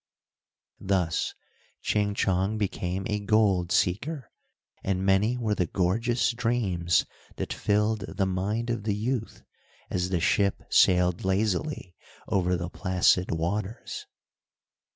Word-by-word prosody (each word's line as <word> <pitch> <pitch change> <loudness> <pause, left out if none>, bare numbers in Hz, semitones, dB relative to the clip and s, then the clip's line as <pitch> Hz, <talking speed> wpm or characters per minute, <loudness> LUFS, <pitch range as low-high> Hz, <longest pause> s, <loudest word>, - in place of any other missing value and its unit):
Thus 95 -4 0 0.5
Ching 105 -1 +1
Chong 95 +2 +1
became 95 -2 -2
a 105 -1 -1
gold 100 -4 +2
seeker, 125 - 0 0.5
and 95 -1 -1
many 100 +5 +3
were 110 -3 0
the 90 -4 0
gorgeous 115 +9 +1
dreams 115 -8 +1 0.3
that - - -3
filled 105 0 +1
the 100 - +2
mind 105 +6 -1
of 115 - -2
the 105 -2 0
youth, 115 +2 -3 0.5
as 90 0 0
the 90 -2 0
ship 100 +4 +1
sailed 90 -1 +4
lazily 95 - -1 0.3
over 90 -2 +1
the 85 0 -4
placid 90 -1 +2
waters. 95 +7 -3
100 Hz, 115 wpm, -27 LUFS, 90-110 Hz, 0.5 s, sailed